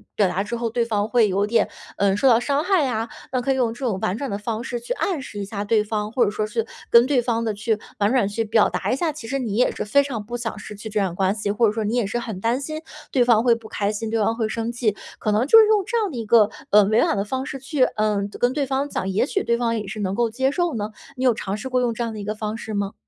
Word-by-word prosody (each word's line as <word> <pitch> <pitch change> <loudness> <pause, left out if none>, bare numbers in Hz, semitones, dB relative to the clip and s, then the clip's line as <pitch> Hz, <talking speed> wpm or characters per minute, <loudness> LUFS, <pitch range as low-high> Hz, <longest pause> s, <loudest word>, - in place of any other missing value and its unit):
表 205 - +3
达 190 +2 -1
之 235 +3 -4
后 235 0 -2
对 235 +1 0
方 210 -2 0
会 225 -2 +3
有 200 +2 +1
点， 225 0 +2 0.3
呃 200 0 +2
受 270 - +3
到 235 -3 +6
伤 280 +4 0
害 360 -6 +2
啊， 225 -2 -2 0.2
那 255 - 0
可 270 +2 +1
以 - - -2
用 245 -3 +1
这 255 +2 -6
种 200 -5 -1
婉 185 +4 -1
转 275 -4 -4
的 200 - -1
方 220 +2 -3
式 245 -2 -4
去 - - -3
暗 365 - -1
示 210 -5 -8
一 200 - -3
下 200 0 -4
对 210 +1 +2
方， 210 0 -3
或 240 -1 +3
者 205 - 0
说 215 0 -2
是 225 +1 -2 0.2
跟 235 +1 +7
对 265 -2 +2
方 230 -1 -1
的 220 - 0
去 215 +1 -1 0.2
婉 205 +3 +2
转 250 -7 +3
去 215 +3 -2
表 220 0 +4
达 - - -2
一 - - +2
下， 315 +3 0
其 285 -6 -9
实 275 +3 -1
你 220 -6 -3
也 250 - +3
是 - - -4
非 280 +7 +4
常 235 -7 -5
不 240 +3 -5
想 225 -2 -4
失 210 0 -9
去 215 +2 -8
这 210 0 -1
段 190 -3 0
关 190 +3 +1
系， 210 -2 -2
或 220 +2 +3
者 - - +2
说 220 +1 -2
你 215 +3 -1
也 240 -4 +1
是 240 - -2
很 225 -5 -5
担 235 +3 +1
心 310 +3 -5 0.3
对 250 -3 +4
方 235 -2 +4
会 240 - +5
不 230 -1 -6
开 205 0 0
心， 220 +1 -4
对 225 - 0
方 225 +2 +1
会 225 - 0
生 230 +1 -3
气。 235 -4 0 0.2
可 215 - 0
能 220 +4 +2
就 450 - +9
是 435 - +7
用 425 -2 +3
这 475 - -1
样 430 -3 +1
的 250 - -6
一 230 - -4
个， 215 -1 +5 0.2
呃， 210 0 +7
委 220 +3 +3
婉 200 - +1
的 200 - -1
方 260 +4 -3
式 270 - -6
去， 270 0 0
呃 215 -4 +1 0.2
跟 245 +1 +2
对 290 -1 0
方 270 +2 -1
讲， 190 - -2
也 195 +5 +1
许 395 +7 -1
对 235 - +1
方 230 -1 0
也 210 - -5
是 215 +2 -6
能 195 -1 -1
够 235 0 +1
接 265 +4 0
受 350 +1 0
呢？ 215 -1 -3 0.3
你 255 - -3
有 250 - +5
尝 200 -1 -4
试 255 +5 -6
过 255 -1 +1
用 235 -2 +1
这 235 - -6
样 230 -1 -3
的 215 - -7
一 205 - -5
个 215 +1 -3
方 215 0 -4
式 220 -2 -6
吗？ 200 0 -2
230 Hz, 340 characters per minute, -23 LUFS, 210-255 Hz, 0.3 s, 就